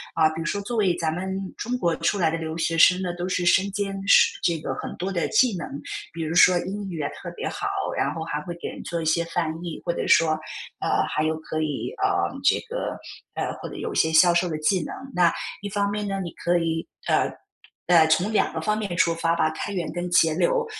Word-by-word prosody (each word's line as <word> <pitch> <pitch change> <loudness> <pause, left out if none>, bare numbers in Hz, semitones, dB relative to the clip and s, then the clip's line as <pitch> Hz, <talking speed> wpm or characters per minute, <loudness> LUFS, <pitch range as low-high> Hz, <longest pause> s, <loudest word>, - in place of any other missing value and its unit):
啊， 160 - +5
比 160 +1 -6
如 - - -4
说 200 - -1
作 220 +4 -4
为 190 -5 +3
咱 160 -2 -1
们 190 +2 -3 0.2
中 250 +2 -3
国 170 -8 +1
出 170 +5 0
来 170 -4 +2
的 165 - -1
留 160 0 -4
学 165 0 0
生 180 +3 +6
呢， 180 -2 -2
都 175 +1 -3
是 180 -1 0
身 190 +3 +4
兼 200 0 -2
十 - - +6
这 170 -1 +1
个 - - -3
很 - - -6
多 185 +2 -3
的 175 -3 0
技 230 -1 +3
能， 170 - -5 0.4
比 165 0 -5
如 160 +1 -3
说 175 +1 +6
英 200 +1 -5
语 175 - -5
也 145 -2 -1
特 - - -8
别 - - -4
好， - - -3 0.3
然 - - 0
后 160 - -4
还 150 -2 -3
会 175 +3 -6
给 - - -5
人 - - -7
做 170 - -3
一 165 - -4
些 160 +2 +2
翻 165 -1 -1
译， 170 -2 -6
或 170 - 0
者 - - -3
说， 165 -1 +5 0.5
呃， - - +1
还 - - -1
有 155 0 0
可 155 0 -4
以， 155 - -2
呃， - - +5 0.4
这 - - +4
个， - - -4 0.4
呃， - - -2
或 - - -6
者 - - -9
有 450 -2 -4
一 - - -7
些 160 - +3
销 175 +2 +6
售 175 +1 +2
的 155 - -2
技 155 +3 +1
能。 - - -6 0.2
那 175 -2 +4 0.3
一 205 - -4
方 200 0 0
面 210 0 -2
呢， 195 0 -2
你 175 -3 -5
可 175 0 0
以 165 -1 -1 0.2
呃， - - +2 0.6
呃， 165 -3 +6
从 175 +7 +2
两 215 - +1
个 160 - -3
方 210 +6 0
面 200 -5 -3
出 170 -1 +3
发 165 0 +1
吧- 160 -2 +2
开 205 - -4
源 175 -4 -3
跟 175 +1 -4
节 165 -2 +4
流。 470 - +1
175 Hz, 270 characters per minute, -24 LUFS, 160-195 Hz, 0.6 s, 生